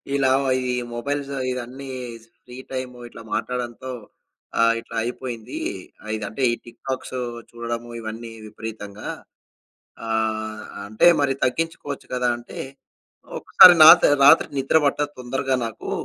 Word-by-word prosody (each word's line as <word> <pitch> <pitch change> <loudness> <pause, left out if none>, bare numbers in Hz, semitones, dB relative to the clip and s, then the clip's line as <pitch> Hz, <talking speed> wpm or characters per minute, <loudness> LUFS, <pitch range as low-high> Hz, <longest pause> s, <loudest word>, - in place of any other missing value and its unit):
ఇలా 135 -2 +2 0.4
ఈ - - +1 0.2
మొబైల్స్ 140 +3 -3 0.2
ఇవన్నీ 125 +2 -6 0.6
ఫ్రీ 125 0 -11
టైము 130 -1 -5
ఇట్లా 115 - -12
మాట్లాడడంతో 125 +1 -4 0.7
ఆహ్, 115 0 +5
ఇట్లా 115 - -11
అయిపోయింది. 120 -2 -5 0.4
ఆహ్, 110 - -6
ఇదంటే 110 +4 -6
ఈ - - 0
టిక్ 120 - -15
టాక్సు 130 -1 -4 0.3
చూడడము 120 0 -5
ఇవన్నీ 115 +1 -7 0.2
విపరీతంగా 105 -1 -8 1.0
ఆహ్, 110 -1 -2 0.2
అంటే 110 +10 +3
మరి 135 -1 +2
తగ్గించుకోవచ్చు 145 0 -2
గదా! 125 -1 0
అంటే 120 - -12 0.8
ఒకసారి 180 - +8
నాత 175 +2 +10 0.2
రాత్రి 155 +4 +7
నిద్ర 135 +4 +3
పట్టదు 145 +1 0
తొందరగా 130 +1 -1
నాకు. 115 - -6
125 Hz, 120 wpm, -23 LUFS, 115-135 Hz, 1.0 s, నాత